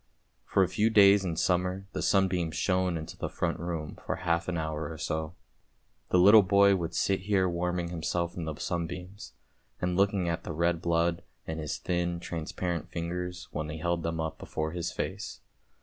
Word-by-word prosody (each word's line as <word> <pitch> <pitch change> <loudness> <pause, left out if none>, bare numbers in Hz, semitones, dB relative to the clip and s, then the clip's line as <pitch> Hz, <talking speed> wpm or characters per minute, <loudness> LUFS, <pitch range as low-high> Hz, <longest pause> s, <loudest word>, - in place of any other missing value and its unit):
For 95 - +3
a - - +2
few 105 +5 +2
days 100 -2 +7
in 85 -3 -2
summer 90 +3 0
the - - -2
sunbeams 90 -4 +2
shone 90 -2 +1
into 80 0 -7
the - - -4
front - - -2
room, 85 -2 -4
for - - -2
half 85 -2 0
an 90 -2 -1
hour 80 -1 -3
or 80 - -7
so. 80 +1 -3 0.7
The - - +3
little 100 +4 +9
boy 100 +1 +5
would 85 -2 -3
sit 95 -1 +2
here 95 -1 +2
warming 90 0 -1
himself 85 0 -2
in 85 - -4
the 80 -1 -4
sunbeams, 90 +4 -5 0.5
and 90 0 0
looking 100 -1 +2
at 85 0 -2
the - - -5
red 85 +1 +1
blood 85 0 +1 0.2
in 80 0 -4
his 75 -2 -3
thin 85 -1 -1
transparent 85 0 -3
fingers 90 +1 -4
when 75 0 -3
he 80 - -5
held 85 +1 -1
them 80 0 -2
up 80 -1 -3
before 80 0 -3
his 85 0 -3
face. - - -5
85 Hz, 185 wpm, -29 LUFS, 80-90 Hz, 0.7 s, little